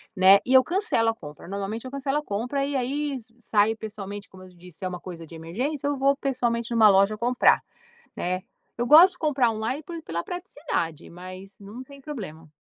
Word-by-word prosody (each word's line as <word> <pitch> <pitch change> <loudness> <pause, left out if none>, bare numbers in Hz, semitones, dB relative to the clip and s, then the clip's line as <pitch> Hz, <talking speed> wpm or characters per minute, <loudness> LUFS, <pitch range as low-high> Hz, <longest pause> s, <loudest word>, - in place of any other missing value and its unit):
né, 190 +1 +7
e 255 - 0
eu 260 0 +8
cancelo 345 - +1
a - - +1
compra. 150 -4 -11
Normalmente 200 +5 -4
eu 255 - -7
cancelo 275 +1 -1
a - - -8
compra, 250 +7 -2
e 285 0 -3
aí 285 +4 -1
s 230 -1 -14
saio 220 -1 +2
pessoalmente. 205 -2 -7
Como 185 0 -14
eu 185 - -13
te 180 - -21
disse, 180 -3 -13
se 190 - -5
é - - +1
uma 180 -1 -5
coisa 170 -2 -9
de 165 - -12
emergência, 255 - -3
eu 285 -1 -1
vou 275 +1 +3
pessoalmente 240 -4 -1
numa 220 -2 +7
loja 195 +2 +4
comprar, 245 +2 +3 0.5
né. 185 +1 -2 0.4
Eu 240 - 0
gosto 335 +6 +8
de - - -15
comprar 275 -6 +2
online 225 +7 -3
por 335 +2 -7
pela 170 +1 -4
praticidade, 290 - -4
mas 185 +3 -11
não 205 +5 -9
tem 280 +1 -14
problema. 190 - -8
225 Hz, 215 wpm, -25 LUFS, 190-275 Hz, 0.5 s, eu